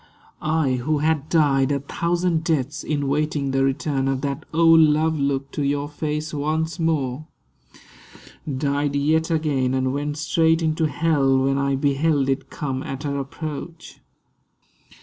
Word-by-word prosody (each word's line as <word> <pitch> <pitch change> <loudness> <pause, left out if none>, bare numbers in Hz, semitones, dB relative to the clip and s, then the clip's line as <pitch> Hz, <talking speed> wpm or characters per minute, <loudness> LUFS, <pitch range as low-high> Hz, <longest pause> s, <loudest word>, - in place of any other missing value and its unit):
I 155 -4 +1
who 150 +5 0
had 155 0 0
died 140 -4 +3
A 140 - +1
thousand 170 +3 -1
deaths, 145 -3 -1
in 145 -2 -1
waiting 145 -1 0
the 135 0 +1
return 135 0 0
Of 135 -1 -1
that 140 0 -3
old 165 0 +6
love 155 0 +3
look 140 -1 -1
to - - -4
your 145 +1 0
face 150 +1 -4
once 155 +3 -2
more, 155 -3 -1 1.2
Died 140 +1 -1
yet 155 +4 +1
again 145 -6 0
and 130 0 0
went 145 +1 -3
straight 160 +1 +2
into 160 0 +1
hell 145 -4 +2
When 135 +1 +1
I 140 0 +1
beheld 140 0 +1
it 135 +1 -2
come 135 -3 -4
at 135 +2 -6
her 140 -1 -2
approach. 155 +4 -7
145 Hz, 150 wpm, -22 LUFS, 135-160 Hz, 1.2 s, old